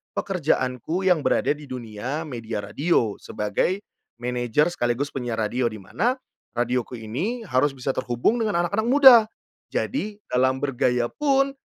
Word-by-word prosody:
pekerjaanku 160 Hz, -, -1 dB
yang 180 Hz, -3 st, +4 dB
berada -, -, +2 dB
di 150 Hz, -, -11 dB
dunia 125 Hz, +3 st, -5 dB
media 115 Hz, -5 st, -5 dB
radio 115 Hz, 0 st, 0 dB
sebagai 105 Hz, -, -1 dB, 0.4 s
manajer 125 Hz, +4 st, +1 dB
sekaligus 120 Hz, -2 st, 0 dB
penyiar 120 Hz, -4 st, -3 dB
radio, 120 Hz, +3 st, 0 dB
di 110 Hz, -, -7 dB
mana 220 Hz, -, -1 dB, 0.4 s
radioku 125 Hz, 0 st, -1 dB
ini 165 Hz, -, -3 dB
harus 130 Hz, +1 st, +2 dB
bisa 130 Hz, +1 st, -1 dB
terhubung 130 Hz, -, 0 dB
dengan 210 Hz, -6 st, +1 dB
anak-anak 215 Hz, +5 st, -1 dB
muda, 265 Hz, -1 st, +9 dB, 0.5 s
jadi 215 Hz, -6 st, -2 dB
dalam 130 Hz, +1 st, +2 dB
bergaya 125 Hz, -3 st, +1 dB
pun 275 Hz, -2 st, +2 dB
130 Hz, 135 wpm, -24 LUFS, 120-185 Hz, 0.5 s, muda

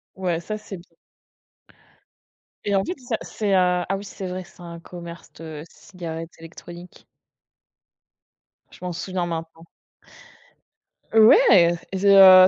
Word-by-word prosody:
Ouais, 180 Hz, -3 st, -1 dB
ça, 215 Hz, +5 st, -5 dB
c'est 205 Hz, -3 st, -9 dB
bien 170 Hz, -, -17 dB, 1.8 s
et 200 Hz, -, +1 dB
en 195 Hz, -, +3 dB
fait 360 Hz, -, -3 dB
c'est 255 Hz, -, -18 dB
ça 240 Hz, -, 0 dB
c'est 205 Hz, -3 st, -2 dB
à 180 Hz, -1 st, +3 dB
ah 195 Hz, -, +1 dB
oui 200 Hz, -, -8 dB
c'est 195 Hz, -1 st, -7 dB
vrai, 185 Hz, +1 st, -4 dB
c'est 180 Hz, -, -18 dB
un 170 Hz, -1 st, -8 dB
commerce 170 Hz, 0 st, -10 dB
de 155 Hz, -2 st, -8 dB
cigarettes 165 Hz, -3 st, -8 dB
électroniques. 175 Hz, +2 st, -12 dB, 1.7 s
Je -, -, -16 dB
m'en 180 Hz, -1 st, -3 dB
souviens 180 Hz, +1 st, -3 dB
maintenant. 165 Hz, -1 st, -6 dB, 1.5 s
Ouais 215 Hz, -, +7 dB, 0.2 s
et 190 Hz, -, -2 dB
heu, 190 Hz, -2 st, +10 dB
180 Hz, 135 wpm, -23 LUFS, 170-195 Hz, 1.8 s, heu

